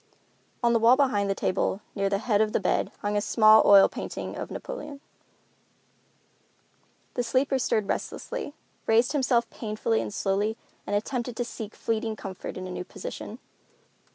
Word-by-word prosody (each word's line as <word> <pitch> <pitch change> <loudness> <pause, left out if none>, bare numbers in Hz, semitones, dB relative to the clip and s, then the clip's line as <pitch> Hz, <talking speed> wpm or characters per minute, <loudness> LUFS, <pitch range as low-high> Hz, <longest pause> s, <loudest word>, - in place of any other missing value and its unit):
On 235 0 +4
the 230 - +4
wall 230 +3 +6
behind 210 -8 +2
the 195 - +1
table, 190 - 0
near 195 -1 0
the 200 - +1
head 210 0 +1
of 215 -1 +1
the - - +2
bed, - - 0
hung 205 0 0
a 205 - +2
small 215 0 +6
oil 200 -1 +8
painting - - -6
of - - -5
Napoleon. 285 -2 -7 2.1
The 245 - -1
sleeper 260 +3 +1
stirred 215 -4 0
restlessly, 310 - -4 0.3
raised 230 +2 +4
himself 255 -5 +2
painfully 210 - -1
and 110 -2 -5
slowly, 205 - 0 0.3
and 205 - 0
attempted 240 +2 -2
to 245 - -1
seek 220 -2 -7
fleeting 225 -1 -2
comfort 190 -3 -7
in 185 - -5
a 185 - -6
new 180 - -4
position. - - -8
220 Hz, 160 wpm, -27 LUFS, 200-245 Hz, 2.1 s, oil